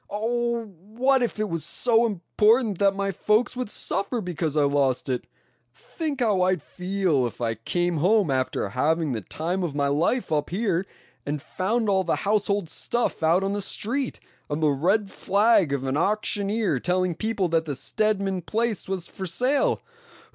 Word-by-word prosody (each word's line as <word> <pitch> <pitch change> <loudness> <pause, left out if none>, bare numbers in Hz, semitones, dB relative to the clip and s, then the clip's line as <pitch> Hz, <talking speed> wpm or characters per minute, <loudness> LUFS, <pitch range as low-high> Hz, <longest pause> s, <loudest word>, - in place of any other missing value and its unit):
Oh! 235 +2 -1
what 220 +8 0
if 235 -3 -1
it 215 - 0
was 165 -4 -3
so 230 +7 +2
important 215 +2 +2
that 195 -1 +3
my 195 0 -1
folks 215 +6 +1
would 250 -3 -3
suffer 210 +3 -1
because 170 -6 -3
I 150 - +4
lost 140 -3 +1
it? 125 -1 -2 0.5
Think 300 -5 -5
how 210 -6 +2
I'd 185 -1 +2
feel 180 -5 0
if 115 - -10
I 115 -2 0
came 175 - -1
home 185 +1 +3
after 130 -6 -1
having 155 +7 +1
the 115 -3 -2
time 170 - -3
of 165 -5 -3
my 140 -1 +1
life 165 - 0
up 150 -1 0
here, 190 -1 0 0.4
and 145 +1 -3
found 210 - -1
all 190 -2 +2
the 170 - 0
household 205 -2 +1
stuff 240 +8 -1
out 165 +4 +3
on 195 +1 -1
the 205 - -2
street, 245 +7 -2 0.3
and 145 +1 -2
the 150 - +4
red 195 +9 +1
flag 205 -5 +3
of 140 -2 -1
an 135 0 -1
auctioneer 205 - 0
telling 180 +3 0
people 210 +1 -1
that 165 0 +1
the 145 -3 -3
Stedman 195 +2 0
place 220 +2 -2
was 185 -3 -3
for 190 -2 -6
sale? 255 - +1
190 Hz, 175 wpm, -25 LUFS, 160-215 Hz, 0.5 s, I